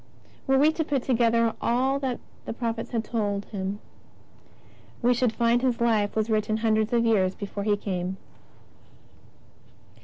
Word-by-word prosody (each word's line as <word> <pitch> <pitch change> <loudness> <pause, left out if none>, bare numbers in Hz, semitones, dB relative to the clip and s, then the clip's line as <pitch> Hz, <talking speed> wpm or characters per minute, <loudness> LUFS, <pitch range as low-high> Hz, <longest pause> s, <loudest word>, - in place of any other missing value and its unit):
Were 270 0 +4
we 295 +3 +5
to 320 0 -1
put 280 -4 -1
together 230 -2 +2
all 260 +3 +1
that 260 -3 -2 0.3
the - - -4
prophets 230 -1 -3
told 205 -3 -2
of - - -24
Him, 195 -1 -3 1.3
we 245 +1 +5
should 245 -1 +1
find 235 +1 +2
His 250 -2 0
Life 220 -3 +1
was 220 -1 +1
written 215 -1 0
hundreds 220 -1 +1
of 235 -1 +2
years 195 -5 +2
before 200 0 -5
He 205 -1 +2
came. 185 -2 -3
230 Hz, 150 wpm, -26 LUFS, 205-245 Hz, 1.3 s, we